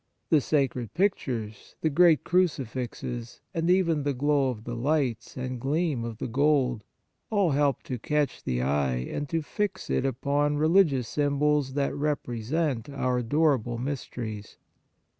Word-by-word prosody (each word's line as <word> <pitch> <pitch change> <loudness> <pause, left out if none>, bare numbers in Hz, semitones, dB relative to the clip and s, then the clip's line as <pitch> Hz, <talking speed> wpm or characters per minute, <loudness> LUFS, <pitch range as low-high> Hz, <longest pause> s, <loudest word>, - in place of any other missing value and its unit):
The 155 -3 +5
sacred 130 -7 0
pictures, 120 - -2
the 160 - +1
great 165 +1 +5
crucifixes, 125 -8 -2
and 165 +1 0
even 175 -4 +3
the 145 -1 -1
glow 140 0 +2
of 110 -4 -5
the 120 - -5
lights 130 -2 -1
and 125 -1 -4
gleam 145 -2 0
of 115 -2 -5
the - - -4
gold 130 -3 +2 0.5
all 200 -6 +2
help 140 0 +1
to 125 -2 -5
catch 150 +4 -1
the 60 -1 -1
eye 70 -1 +1
and 130 - -4
to 165 +1 -1
fix 205 +6 -3
it - - +1
upon 140 +3 0
religious 155 -6 +3
symbols 145 -1 +1
that 140 -1 0
represent 140 -1 -1
our 130 -3 0
adorable 125 -2 +1
mysteries. 115 -5 -5
140 Hz, 140 wpm, -27 LUFS, 120-150 Hz, 0.5 s, The